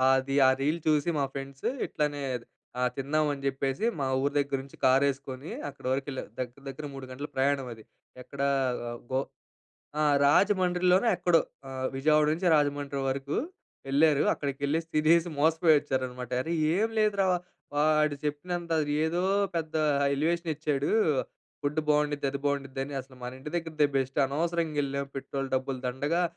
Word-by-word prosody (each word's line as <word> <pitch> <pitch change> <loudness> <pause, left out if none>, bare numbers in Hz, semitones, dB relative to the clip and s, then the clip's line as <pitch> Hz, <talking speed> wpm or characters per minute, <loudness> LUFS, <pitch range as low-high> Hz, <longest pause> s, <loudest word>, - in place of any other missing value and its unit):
అది. 135 +1 -1
ఆ - - +7
రీల్ 155 +4 +1
చూసి 150 +1 +3
మా 140 - +2
ఫ్రెండ్స్ 135 0 -5 0.2
ఇట్లనే 145 -1 -2 0.7
తిందాం 150 +3 0
అని 140 -1 -6
చెప్పేసి 135 +8 -1
మా 140 - -1 0.2
ఊరి 140 +1 0
దగ్గర 140 -1 +1
నుంచి 135 - -14
కారేసుకొని 135 +1 +1 0.2
అక్కడి 140 -2 -8
వరకు 135 +1 0
వెళ్ళారు. 130 - -5
దగ్గర 125 +2 -5
దగ్గర 140 +3 -7
3 135 -1 -7
గంటలు 140 +3 -6
ప్రయాణం 135 0 +1
అది. 110 - -14 0.4
ఎక్కడ 135 +2 -8 0.7
గో 130 - +2 0.8
ఆహ్, 150 -1 +4
రాజమండ్రిలోనో 185 +4 +3
ఎక్కడో, 175 -2 +4 0.6
విజయవాడ 150 +2 +4
నుంచి 175 +3 +1
రాజమండ్రి 145 -2 0
వరకు 135 +2 -3 0.5
వెళ్లారు. 145 +1 +4
అక్కడికి 140 -2 -3
వెళ్ళేసి 160 +3 0
తినేసి, 165 +3 +4
మోసపోయి 160 +1 +4
వచ్చారనమాట. 130 -3 -3
"అరే 165 - -3 0.2
ఏం 220 +3 +2
లేదురా! 200 -2 +2 0.5
వాడు 150 0 +3
చెప్పినంత 170 +3 -3 0.3
ఏదో 170 +3 0 0.3
పెద్ద 160 -1 -3 0.4
ఎలివేషన్ 165 +4 0
ఇచ్చాడు. 145 -2 -1 0.7
ఫుడ్ 145 +2 0
బాగుండిద్ది, 150 -1 +2
అది 140 - -3
బాగుండిద్ది 140 -1 -2
అని. 145 - -7
అసలు 130 0 -15
మన 125 - -4
ఇంటి 140 +3 -7
దగ్గరదే 160 -3 +1
బెస్ట్ 135 +1 -1
అనవసరంగా 165 +2 -1
వెళ్ళాం, 140 0 -2
పెట్రోల్ 135 0 -4
డబ్బులు 130 0 -1
దండగా. 145 +8 0
145 Hz, 145 wpm, -28 LUFS, 135-160 Hz, 0.8 s, ఆ